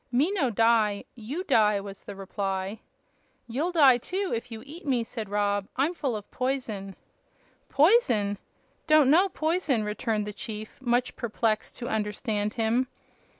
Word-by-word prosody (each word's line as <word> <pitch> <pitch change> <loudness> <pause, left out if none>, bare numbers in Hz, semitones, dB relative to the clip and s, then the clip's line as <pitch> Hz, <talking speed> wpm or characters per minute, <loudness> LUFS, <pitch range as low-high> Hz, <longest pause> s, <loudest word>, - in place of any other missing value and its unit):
"Me 275 +9 +2
no 330 -11 +1
die. 220 -2 +2
You 255 +10 -5
die," 210 - +3
was 195 0 -9
the 205 - -8
reply. 195 +1 -3 0.7
"You'll 285 +10 -1
die, 275 -8 +6
too, 380 +8 -3
if 230 +1 -6
you 220 -1 -7
eat 315 +5 -10
me," 255 -5 +1
said 225 -3 -6
Rob. 205 -1 0
"I'm 290 +6 +1
full 275 -8 -2
of 205 -1 -8
poison." 230 -7 -3 0.7
"Poison? 245 - +3 0.5
Don't 305 -3 +6
know 365 +5 +5
poison," 315 - 0
returned 210 0 -1
the 210 - -5
chief, 215 +1 -8
much 245 0 +1
perplexed 220 -2 -1
to 245 - -5
understand 210 -1 -2
him. 235 +2 +1
230 Hz, 150 wpm, -27 LUFS, 210-275 Hz, 0.7 s, die